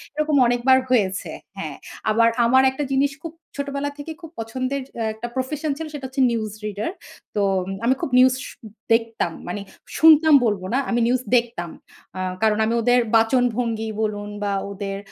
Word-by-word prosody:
এরকম 305 0 +1
অনেকবার 245 +2 +4
হয়েছে, 195 -6 +1 0.3
হ্যাঁ। - - -5 0.3
আবার 230 +2 +4 0.2
আমার 260 +3 +5
একটা 265 +3 -3
জিনিস 275 +1 +2
খুব 330 -1 -6 0.2
ছোটবেলা 280 0 -3
থেকেই 310 +2 -7
খুব 330 -2 -10
পছন্দের 255 +4 -3 0.3
একটা 220 +2 -6
প্রফেশন 290 +4 -2
ছিল 320 0 -5
সেটা 285 -3 -6
হচ্ছে 265 +1 -2
নিউজ 215 -3 -2
রিডার। 210 - -3 0.4
তো 205 - +1 0.4
আমি 250 - +4
খুব - - -2
নিউজ 255 0 +6
শু - - -11 0.4
দেখতাম। 225 -6 0 0.2
মানে 200 +3 -4 0.4
শুনতাম 315 -1 +7
বলব 205 -4 0
না, - - +3
আমি 240 - +1
নিউজ 250 +1 +1
দেখতাম। 235 -8 0 0.5
আ - - -4 0.2
কারণ 215 -1 +3
আমি 225 - 0
ওদের 245 +2 +4 0.2
বাচনভঙ্গি 230 -1 +1
বলুন 205 -1 -2
বা 200 -1 0 0.2
ওদের 195 0 -4
245 Hz, 165 wpm, -22 LUFS, 220-275 Hz, 0.5 s, শুনতাম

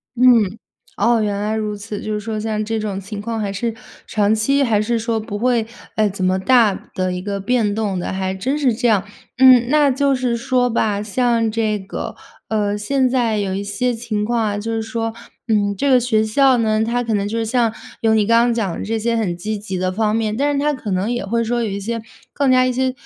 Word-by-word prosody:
嗯， 230 -5 +4 0.4
哦， 230 +1 +2
原 205 -1 -1
来 210 +1 -1
如 210 -1 -2
此， 205 0 -6
就 215 - -3
是 210 - -2
说 220 0 -4
像 215 -1 -2
这 225 +1 -2
种 205 -3 -3
情 200 +1 -7
况 225 +1 -3
还 200 -2 -2
是 225 +3 -2 0.3
长 210 0 +2
期 275 +6 +2
还 220 -5 +2
是 235 +1 0
说 225 0 -1
不 205 -1 -5
会， 235 -1 +1 0.3
呃， 215 -1 +3
怎 185 -1 -4
么 185 +1 +2
大 225 -1 +4 0.2
的 185 -1 -1
一 180 - -4
个 200 0 -3
变 210 -1 +1
动 205 -4 -1
的， 175 - -3
还 190 0 -2
真 260 +10 -2
是 255 -6 +2
这 245 +1 0
样。 205 -4 +3 0.3
嗯， 255 -2 +7
那 295 -2 +4
就 275 +1 +2
是 250 -2 0
说 250 0 +1
吧， 210 -3 0
像 230 +1 +1
这 215 -1 0
个， 190 0 -6 0.3
呃， 205 -2 0
现 255 +5 +1
在 240 -4 +1
有 195 -2 -1
一 195 - -2
些 240 +5 -1
情 220 -2 -3
况 235 +1 0
啊， 205 -2 -1
就 225 +2 -4
是 225 0 -1
说， 225 0 -3 0.3
嗯， 205 -2 +1
这 280 - +1
个 255 -2 +5
学 220 -3 +1
校 260 +4 +4
呢， 220 -1 +1
它 245 +2 -1
可 225 -2 -1
能 200 0 0
就 225 +2 -2
是 225 - 0
像， 230 -1 +1 0.3
有 220 -1 +3
你 210 -2 +2
刚 230 +1 +5
刚 240 0 +2
讲 210 -7 -1
的 - - -5
这 225 +2 -1
些 235 +2 0
很 190 -7 -1
积 215 +4 -3
极 195 -2 -5
的 185 0 -1
方 215 +2 0
面， 220 -1 -1
但 285 +2 +1
是 280 - 0
它 295 +1 +1
可 225 -5 -6
能 190 +3 0
也 240 -4 -2
会 230 +3 0
说 240 +1 -1
有 215 - -2
一 195 - -3
些 230 +3 -4 0.3
更 280 -2 +1
加 255 0 +5
一 255 - +1
些 260 +1 0
220 Hz, 260 characters per minute, -19 LUFS, 205-240 Hz, 0.4 s, 嗯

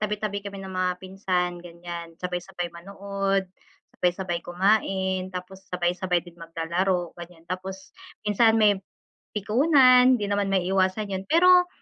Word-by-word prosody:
tabi-tabi 210 -1 -2
kami 200 0 -8
ng 190 - -7
mga 185 0 0
pinsan 180 -2 -2
gan'yan, 170 -1 -9
sabay-sabay 180 0 -4
manood, 195 +2 -2 0.5
sabay-sabay 180 -1 -1
kumain, 190 0 0
tapos 190 +1 -9
sabay-sabay 180 0 0
din 175 - -13
maglalaro 170 +2 -1
gan'yan. 170 -1 -12
Tapos 190 +2 -7 0.3
minsan 225 +2 +4
may 205 -3 +4 0.6
pikunan, 255 - +5
di 210 - -3
naman 200 -1 0
maiiwasan 190 +2 +1
'yon 190 0 -3
pero 360 +2 +6
190 Hz, 120 wpm, -25 LUFS, 175-205 Hz, 0.6 s, pero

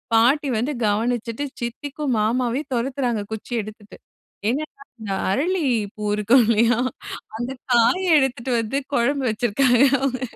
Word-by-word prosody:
பாட்டி 270 +6 +4
வந்து 265 +7 -1
கவனிச்சிட்டு 230 +4 -1 0.2
சித்திக்கும் 270 +2 -3
மாமாவையும் 250 +5 -1
துரத்துறாங்க. 245 -2 -1
குச்சி 220 +3 -7
எடுத்துட்டு. 210 0 -11 0.5
என்னென்னா, 280 +1 -4 0.2
இந்த 205 -3 -5 0.2
அரளி 335 - 0 0.3
பூ 215 - -7
இருக்கும் 230 +5 +4
இல்லயா! 230 +1 +3 0.6
அந்த 240 +3 -4 0.2
காயை 300 +11 +3
எடுத்துட்டு 260 -1 -1
வந்து 225 +5 -2 0.2
குழம்பு 275 +2 +1
வச்சிருக்காங்க 240 +3 +2 0.2
அவுங்க. 265 -1 -1
245 Hz, 120 wpm, -22 LUFS, 225-275 Hz, 0.6 s, பாட்டி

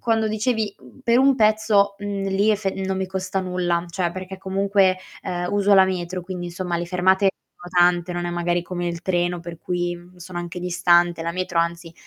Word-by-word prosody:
quando 225 -1 +1
dicevi, 215 -1 -1
mhmm, 125 -1 -17
"per 235 +1 +3
un 270 +1 +5
pezzo", 215 -3 +3
mhmm, 200 -1 -3
lì 200 +3 +2
efe 205 -2 0
non 190 0 -1
mi 190 0 -2
costa 190 0 -2
nulla, 180 -2 -1
cioè 175 0 -1
perché 185 +1 -7
comunque, 195 0 +2 0.3
uhm, 175 0 -3
uso 205 0 +2
la 190 -1 +7
metro, 185 -1 -3
quindi 180 0 -5
insomma 175 0 -3
le 170 - -2
fermate 190 +2 +3 0.3
sono 175 - -8 0.2
tante, 175 0 -4
non 175 0 -3
è 175 - -2
magari 175 0 0
come 175 0 -4
il 170 0 -5
treno 175 -1 0
per 170 0 -8
cui, 175 0 -2
mhmm, 175 +1 -17
sono 175 0 -7
anche 175 +1 -5
distante; 175 -1 +2
la 170 +1 -2
metro 180 -1 -2
anzi 170 0 -1
185 Hz, 205 wpm, -23 LUFS, 175-195 Hz, 0.3 s, la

